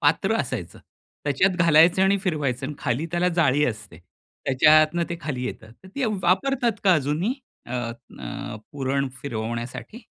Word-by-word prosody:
पात्र - - +2
असायचं. - - -5 0.5
त्याच्यात 175 +7 +2
घालायचं 170 +3 +6
आणि 195 +1 +4
फिरवायचं 145 - -1
आणि 150 - -5
खाली 135 +4 -1
त्याला 175 +1 +1
जाळी 150 -4 +2
असते. 105 -8 -5 0.5
त्याच्यातनं 155 +5 +5
ते 170 - -3
खाली 135 -5 -3
येतं. 110 -3 -6
तर 190 +10 -17
ती 275 - -1 0.2
वापरतात 240 +6 +2
का 185 -3 +6
अजूनही 155 - 0 0.3
अ, 120 - -8 0.5
अ, 65 - -6 0.2
पुरण 140 0 -1
फिरवण्यासाठी? 120 - -5
150 Hz, 140 wpm, -24 LUFS, 130-180 Hz, 0.5 s, घालायचं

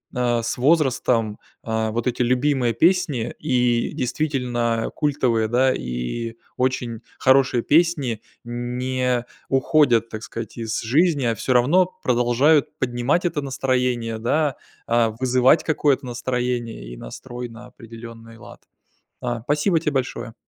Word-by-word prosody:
а, 120 -1 +1
с 115 - -2
возрастом, 125 -7 +2 0.2
а, 110 -3 -1
вот 115 +1 -2
эти 125 -1 -1
любимые 125 -1 +2
песни, 150 - +1
и 125 -2 +1
действительно 125 -5 -1
культовые, 130 -7 +1
да, 130 +3 +3
и 65 - -4 0.2
очень 125 -3 -1 0.2
хорошие 130 -2 +3
песни, 145 -8 +2 0.2
не 125 +1 -2 0.2
уходят, 135 -4 +3
так 110 0 -6
сказать, 115 0 -7
из 110 -1 -2
жизни, 145 +4 +2
а 115 - +2
всё 130 - -1
равно 145 +10 +4 0.2
продолжают 125 +5 +2
поднимать 125 +7 0
это 160 -4 0
настроение, 125 -4 -1
да, 140 +4 0 0.3
а, 115 -1 +2
вызывать 125 +5 +3
какое-то 145 -3 +1
настроение 120 - -3
и - - -10
настрой 120 - -8
на 115 +1 -12
определенный 115 -1 -12
лад. - - -13 0.6
А, 120 -1 -3
спасибо 150 - +1
тебе 155 -1 -2
большое! 125 -3 -3
125 Hz, 125 wpm, -22 LUFS, 115-135 Hz, 0.6 s, равно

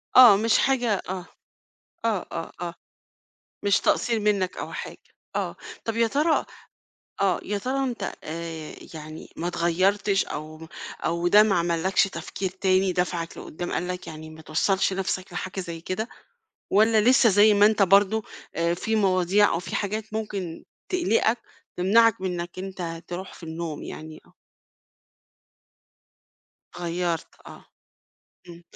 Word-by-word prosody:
آه، 245 -5 +10
مش 225 +2 +3
حاجة 245 -5 +2 0.2
آه 185 -1 -4 0.8
آه 215 -5 0
آه، 165 - -5
آه 170 -1 -3 0.9
مش 200 -1 +3
تقصير 230 -1 +1
منك 200 -3 +1
أو - - -5
حاجة - - -6 0.4
آه - - -2 0.3
طَب 225 0 -2
يا 230 0 +4
ترى 300 +7 +2 0.8
آه 190 -3 +2
يا 205 0 -2
ترى 265 +6 -1
أنت، 245 -3 -3
آآ، 160 -1 -6 0.2
يعني 155 0 -9
ما 170 - -2
اتغيّرتش 190 +4 +2
أو 155 +2 -7 0.4
أو 170 +1 +1
ده 210 +4 +8
ما 215 -2 +2
عملّكش 175 +3 +2
تفكير 185 +1 -4
تاني 190 0 +2
دفعك 175 -1 -2
لقدام، 175 +3 -6
قال 180 - -1
لك 180 0 -5
يعني 155 0 -8
ما 160 0 -12
توصلش 190 +6 +1
نفْسك 190 -1 -3
لحاجة 185 +1 -4
زي 170 -2 -6
كده؟ 185 +7 -3 0.6
والّا 220 +2 +5
لسه 245 +2 +5
زي 205 +1 +6
ما 205 0 +6
أنت 215 -1 +3
برضو، 200 +3 +4 0.3
آآ، 170 +1 +1
في 220 +5 -1
مواضيع 195 0 +4
أو 165 - 0
في 175 - -4
حاجات 215 +1 -3
ممكن 200 -6 -4 0.2
تقلقك، 245 - +2 0.4
تمنعك 215 +4 +4
من 180 -2 -2
إنك 175 +1 -7
أنت 180 -3 -5
تروح 180 +2 -6
في - - -15
النوم؟ 160 -1 -5
يعني 155 0 -8
آه. - - -23 2.4
اتغيّرت 175 -1 -2 0.2
آه. - - -12 0.8
إمم. 170 0 -11
185 Hz, 140 wpm, -25 LUFS, 170-210 Hz, 2.4 s, آه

